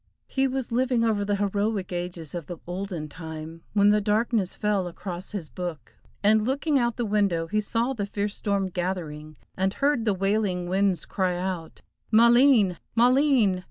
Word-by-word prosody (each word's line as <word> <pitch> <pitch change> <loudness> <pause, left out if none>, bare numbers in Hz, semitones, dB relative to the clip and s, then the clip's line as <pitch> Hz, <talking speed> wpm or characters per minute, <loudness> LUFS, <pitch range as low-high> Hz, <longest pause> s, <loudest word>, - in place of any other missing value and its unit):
He 270 0 0
was 260 -2 -3
living 245 0 +2
over 215 -3 +1
the 205 0 0
heroic 200 -1 -1
ages 175 -3 -5
of 170 -4 -5
the 175 - -6
olden 180 -3 -4
time, 160 +1 -8
when 205 0 +5
the 210 0 +3
darkness 210 -1 0
fell 205 -3 0
across 175 +1 -6
his 185 -7 -4
book, 175 -3 -7 0.3
and 215 +1 +4
looking 280 +4 +1
out 235 -1 0
the 240 - -2
window 200 -6 +1
he 215 +5 0
saw 230 +5 0
the 205 -5 -3
fierce 205 0 -2
storm 200 -2 -1
gathering, 160 -5 -4 0.2
and 190 +1 0
heard 275 -4 +1
the 210 -3 +2
wailing 195 -2 0
winds 190 0 +1
crying 185 -2 -1
out, 180 -3 -4 0.3
Maleen! 235 -4 +5 0.2
Maleen! 245 -5 +4
200 Hz, 165 wpm, -26 LUFS, 180-225 Hz, 0.3 s, when